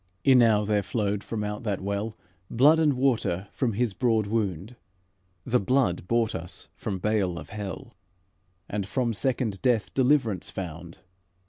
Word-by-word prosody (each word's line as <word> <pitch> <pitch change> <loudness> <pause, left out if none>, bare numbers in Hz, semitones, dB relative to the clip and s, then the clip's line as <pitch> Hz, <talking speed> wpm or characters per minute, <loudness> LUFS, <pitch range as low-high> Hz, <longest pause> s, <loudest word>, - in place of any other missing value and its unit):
"Enow 115 -6 +5
there 105 0 +2
flowed 100 0 -2
from 110 -2 -4
out 105 0 -4
that 105 -4 -2
well, 100 +3 -3 0.3
Blood 145 +7 +5
and 155 -3 +3
water 120 -8 0
from 125 -5 -1
His 115 0 0
broad 115 -2 +1
wound: 100 0 -2 0.7
The 125 - +2
blood 100 -6 +1
bought 115 0 +1
us 85 +2 -5
from 100 -3 -4
bale 95 -3 0
of - - -9
hell, 105 +4 -6 0.7
And 100 -2 -3
from 120 +1 0
second 120 -3 -1
death 120 -4 +1
deliverance 125 - +2
found. 85 -2 -7
110 Hz, 145 wpm, -26 LUFS, 100-125 Hz, 0.7 s, Enow